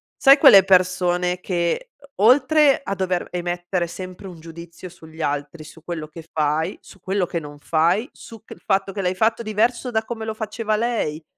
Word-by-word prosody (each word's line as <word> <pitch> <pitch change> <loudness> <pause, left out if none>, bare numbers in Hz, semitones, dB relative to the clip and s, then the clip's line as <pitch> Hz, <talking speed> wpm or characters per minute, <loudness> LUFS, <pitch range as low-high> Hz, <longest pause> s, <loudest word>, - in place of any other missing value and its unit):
Sai 275 +1 +6
quelle 205 - +8
persone 180 -1 +2
che 180 - -2 0.3
o 205 - +3
oltre 285 +4 +4
a 195 - -3
dover 185 -2 -2
emettere 175 0 -3
sempre 185 +2 -9
un 175 -3 -11
giudizio 170 +2 -11
sugli 160 -2 -13
altri, 145 +2 -3
su 160 +1 -15
quello 165 -3 -6
che 160 +2 -11
fai, 155 +3 -1
su 195 - -17
quello 190 0 -1
che 170 - -4
non 145 -2 -11
fai, 170 - +1
su 225 -2 -14
che - - -11
il - - -19
fatto 195 -1 0
che 195 - -4
l'hai 180 0 -1
fatto 225 +3 +1
diverso 230 +3 0
da 220 -2 -1
come 225 -1 -6
lo 220 0 -4
faceva 215 0 -3
lei. 210 -9 -2
185 Hz, 190 wpm, -21 LUFS, 170-220 Hz, 0.3 s, quelle